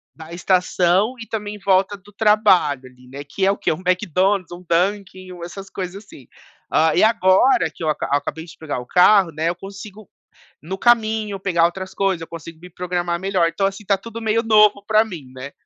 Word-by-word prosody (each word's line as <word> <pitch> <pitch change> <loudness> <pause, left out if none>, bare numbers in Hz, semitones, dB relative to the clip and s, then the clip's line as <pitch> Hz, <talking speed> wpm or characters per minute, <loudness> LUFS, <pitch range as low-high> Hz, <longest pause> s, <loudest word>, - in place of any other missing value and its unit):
da 160 0 -12
estação, 180 +4 +1
e 225 - -7
também 210 -2 -5
em - - -12
volta 195 +1 +1
do 205 +2 -20
trabalho, 195 -10 +3
ali. 125 0 -17 0.2
Que 190 +7 -1
é - - +4
o 200 - -3
que? - - -1
Um 165 - -8
McDonald's, 185 +1 0
um 175 +1 -9
Dunkin, 185 +1 -1
um 175 -1 -10
essas 195 +3 -9
coisas 190 +2 -6
assim. 135 -9 -15 0.4
Ah, 160 +1 +3
e - - +3
agora 220 +2 +3
que - - -9
eu 155 - 0
aca 155 - -2
acabei 145 +3 -2
de 165 - -14
pegar 155 -4 -4
o 125 - -9
carro, 185 +3 +4
né, 160 +2 -1
eu 175 - -3
consigo 200 +2 -11 0.6
no 190 +5 -6
caminho, 220 -3 +1
pegar 170 -3 +2
outras 185 +2 -6
coisas, 195 -4 -1
eu - - -7
consigo 165 0 -10
me 180 +2 -13
programar 175 -1 -3
melhor. 190 -3 +1
Então 195 +4 -1
assim, 195 +1 -5
está 200 -1 0
tudo 230 +3 -9
meio 220 +1 +1
novo 210 -2 +4
pra 215 0 +4
mim, 165 -12 -10
né. 130 +2 -8
185 Hz, 205 wpm, -20 LUFS, 170-205 Hz, 0.6 s, é